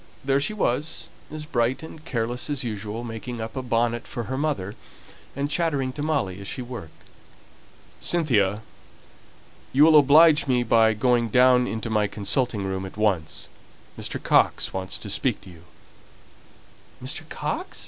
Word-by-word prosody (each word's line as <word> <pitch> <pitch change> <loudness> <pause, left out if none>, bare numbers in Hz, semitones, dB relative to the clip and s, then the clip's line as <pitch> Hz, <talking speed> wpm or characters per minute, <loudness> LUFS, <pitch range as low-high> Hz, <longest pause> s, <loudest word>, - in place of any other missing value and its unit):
There 135 0 +3
she 215 +10 -1
was, 150 -5 -1 0.2
as 155 0 -6
bright 125 -1 0
and 160 -1 -10
careless 120 -2 -2
as 145 -3 -2
usual, 110 0 -4
making 115 +1 -6
up 110 +3 -6
a 130 - -2
bonnet 120 -1 0
for 120 - -4
her 130 +4 -4
mother, 135 -9 -2 0.6
and 140 +1 -1
chattering 145 -4 0
to 145 - -6
Molly 135 -12 -1
as 100 - -7
she 130 - -4
worked. 120 -10 -9 1.0
"Cynthia, 110 - +1 1.1
you 140 +3 +5
will 155 -1 +8
oblige 150 +2 +6
me 125 -2 +2
by 110 -1 +4
going 120 +1 +2
down 125 +1 +5
into 110 +1 -4
my 105 -1 +2
consulting 105 +2 -1
room 95 0 -3
at 95 +1 -9
once. 95 -8 0 0.5
Mr. - - -4
Coxe - - +2
wants 95 0 -3
to - - -8
speak 110 +3 0
to 95 -2 -13
you!" 85 -1 -16 1.4
"Mr. - - -5
Coxe?" - - -4
120 Hz, 155 wpm, -25 LUFS, 105-140 Hz, 1.4 s, will